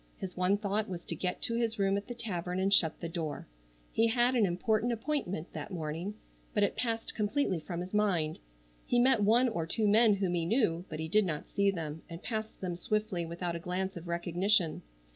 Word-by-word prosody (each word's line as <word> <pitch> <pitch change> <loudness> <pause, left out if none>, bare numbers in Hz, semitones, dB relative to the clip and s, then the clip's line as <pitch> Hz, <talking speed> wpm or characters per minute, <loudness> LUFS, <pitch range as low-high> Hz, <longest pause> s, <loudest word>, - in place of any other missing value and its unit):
His 185 -1 -6
one 185 +2 +2
thought 210 0 -1
was 175 -2 -6
to 165 - -3
get 180 +3 -2
to 230 - +1
his 230 -1 0
room 195 -1 +2
at 200 0 -3
the 245 - -5
tavern 180 -6 -3
and 195 +1 +2
shut 160 -4 +4
the 170 - -2
door. 160 -3 -4 0.5
He 225 - +3
had 240 +2 +3
an 230 -5 +4
important 215 +6 +1
appointment 230 - -2
that - - -5
morning, 170 +3 -4 0.4
but 205 - +3
it 200 - +1
passed 225 0 -1
completely 210 - 0
from 170 +2 -5
his 180 +2 -7
mind. 180 -7 +1 0.5
He 245 - +2
met 245 -2 +5
one 230 +5 +5
or 170 -9 -2
two 215 +5 +1
men 215 0 +6
whom 190 -3 0
he 170 -1 +1
knew, 180 -6 +2
but 155 - -5
he 160 - -2
did 210 +6 +4
not 155 -3 -4
see 200 0 +3
them, 160 -4 -4
and 170 +2 -8
passed 220 -2 -4
them 180 -2 -2
swiftly 205 -2 -1
without 170 +1 -3
a - - -3
glance 185 +3 -3
of 170 0 -8
recognition. 175 +1 +1
195 Hz, 215 wpm, -31 LUFS, 170-220 Hz, 0.5 s, men